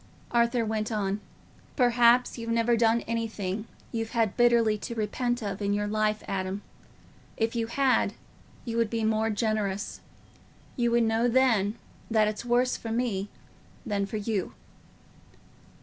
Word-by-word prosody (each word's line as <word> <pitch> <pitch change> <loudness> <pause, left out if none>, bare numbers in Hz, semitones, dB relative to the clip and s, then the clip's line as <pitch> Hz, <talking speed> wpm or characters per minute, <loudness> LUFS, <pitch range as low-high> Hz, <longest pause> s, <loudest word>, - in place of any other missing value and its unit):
Arthur 235 0 +2
went 215 0 -2
on, 200 -2 -1 0.6
"Perhaps 245 -1 +4
you've 230 -1 -6
never 230 +1 +2
done 230 0 +3
anything 220 -2 -3 0.2
you've 225 0 -3
had 225 -4 +1
bitterly 235 -3 +4
to 235 - -5
repent 240 +3 -1
of 200 -1 -4
in 200 0 +1
your 205 0 0
life, 215 0 0
Adam; 190 +1 -3 0.7
if 225 +1 0
you 230 -1 0
had, 265 +2 +2 0.5
you 230 -1 -3
would 230 -2 +2
be 225 0 -2
more 220 0 +1
generous. 210 -2 -1 0.7
You 240 -3 +1
would 235 0 +3
know 225 +1 +2
then 230 -5 +3 0.3
that 220 -2 +3
it's 210 +1 -3
worse 245 +1 +2
for 225 - -6
me 220 -4 -1 0.6
than 200 -2 -1
for 215 - -4
you." 205 -3 -2
225 Hz, 145 wpm, -28 LUFS, 210-235 Hz, 0.7 s, Perhaps